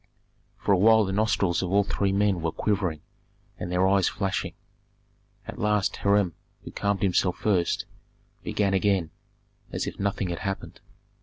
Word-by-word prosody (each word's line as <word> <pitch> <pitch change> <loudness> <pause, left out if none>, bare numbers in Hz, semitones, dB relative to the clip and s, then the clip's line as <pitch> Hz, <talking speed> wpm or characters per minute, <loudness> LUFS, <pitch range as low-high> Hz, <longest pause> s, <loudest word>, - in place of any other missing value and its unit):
For - - -1
a 95 - +4
while 110 +1 +6
the 95 - -3
nostrils 100 -4 +1
of 90 -1 -3
all 100 +1 +4
three 100 0 -1
men 100 -2 +1
were 80 0 -1
quivering 90 -7 -1 0.6
and 90 - -4
their 90 +1 +3
eyes 95 -1 +3
flashing. 95 -3 -3 0.9
At - - -8
last 105 -2 +1
Hiram, 100 -3 +2 0.3
who - - -9
calmed 100 -2 -1
himself 90 -1 +2
first, 90 -5 0 0.6
began 100 -2 0
again, 95 -4 +1 0.6
as - - -2
if - - -6
nothing 100 -2 -1
had 85 - -3
happened. 100 -1 -5
95 Hz, 155 wpm, -26 LUFS, 90-100 Hz, 0.9 s, while